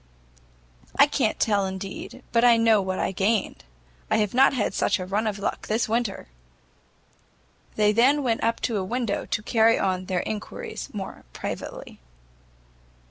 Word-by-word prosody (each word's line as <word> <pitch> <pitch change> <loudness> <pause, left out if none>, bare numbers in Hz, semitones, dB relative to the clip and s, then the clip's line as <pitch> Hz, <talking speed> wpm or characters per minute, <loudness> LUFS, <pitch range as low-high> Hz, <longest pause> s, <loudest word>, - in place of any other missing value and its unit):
"I 280 - +7
can't 270 -6 0
tell 205 -3 +2
indeed, 195 +6 -7
but 230 0 +3
I 240 -1 +6
know 225 -2 +4
what 190 -1 -3
I - - -1
gained: 200 +2 0 0.5
I - - +2
have 210 -2 0
not 265 +2 +5
had 245 -6 -1
such - - +1
a 185 - -5
run 205 +4 -1
of 210 -2 -2
luck 200 - -3
this 220 +2 0
winter." 225 - -2 1.5
They 210 -1 +3
then 265 +7 +3
went 230 -3 0
up 230 +1 +1
to 230 -4 -1
a 190 - -1
window 230 +1 -2
to 210 - -2
carry 225 0 +3
on 185 -1 -1
their 185 -1 -1
enquiries 440 - -6
more 195 -2 -7
privately. - - -7
215 Hz, 160 wpm, -25 LUFS, 195-235 Hz, 1.5 s, I